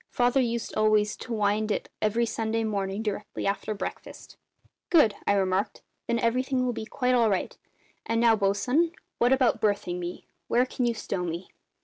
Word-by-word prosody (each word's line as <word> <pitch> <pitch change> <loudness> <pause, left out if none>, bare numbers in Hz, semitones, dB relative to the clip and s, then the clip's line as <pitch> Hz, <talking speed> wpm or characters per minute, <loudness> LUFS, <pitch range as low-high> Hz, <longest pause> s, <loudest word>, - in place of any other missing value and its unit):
Father 245 +2 +2
used 235 -2 -2
always 215 -1 +3
to 245 - -9
wind 215 0 +1
it - - -2
every 225 +2 +2
Sunday 225 0 -1
morning 200 -1 -2
directly 210 -1 -4
after 205 +2 -1
breakfast." 200 - -7 0.5
"Good!" 295 - +5
I - - +4
remarked. 190 0 0 0.2
"Then 235 - +1
everything 255 +2 +1
will 245 - 0
be 220 - -5
quite 250 +2 0
all 235 -3 +4
right. 190 -3 -1 0.5
And 230 0 +1
now, 230 -1 +5
bosun, 245 +11 +1 0.3
what 240 +1 +3
about 260 -3 +3
berthing 200 -4 0
me? 175 0 -6 0.2
Where 245 +2 +3
can 255 -1 -2
you 235 - 0
stow 195 -3 -3
me?" 170 +1 -5
220 Hz, 170 wpm, -27 LUFS, 205-240 Hz, 0.5 s, Good